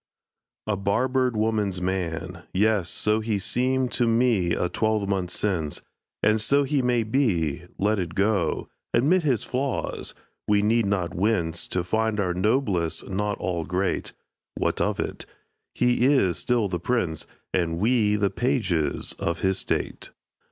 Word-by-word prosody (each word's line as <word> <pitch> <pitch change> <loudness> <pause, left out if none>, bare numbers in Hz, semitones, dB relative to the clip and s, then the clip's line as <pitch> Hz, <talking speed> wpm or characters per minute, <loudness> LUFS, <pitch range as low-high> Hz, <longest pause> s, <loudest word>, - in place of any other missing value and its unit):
"A 105 - 0
barbered 125 +5 +1
woman's 105 -4 0
man," 90 -3 -3
yes, 105 -3 +2
so 105 +1 +1
He 110 -1 -1
seemed 125 +5 0
to 120 -2 +1
me 115 -6 +2
a 90 - 0
twelvemonth 100 -2 0
since; 90 -6 -1 0.4
And 110 +1 +3
so 140 +6 +4
he 140 0 +1
may 125 -2 +2
be 90 - 0
let 105 +1 +1
it 85 -2 -4
go 95 -5 +1 0.3
Admit 165 +9 +4
his 135 -8 +1
flaws 130 +1 -2 0.3
we 105 -1 +3
need 115 0 +2
not 95 -3 -1
wince 85 -4 0
To 90 - -1
find 110 +4 0
our 90 -3 +1
noblest 95 -4 0
not 105 +2 -1
all 85 -3 -2
great. 90 +4 -1 0.4
What - - 0
of - - 0
it? - - -4 0.5
He 125 0 +2
is 130 - +3
still 120 -4 +1
the 90 -2 -3
prince, 90 -6 -1 0.3
And 85 -2 0
we 105 +1 +2
the 100 -2 +1
pages 115 - 0
of 85 0 -2
his 95 0 +1
state. - - -3
105 Hz, 145 wpm, -25 LUFS, 90-120 Hz, 0.5 s, so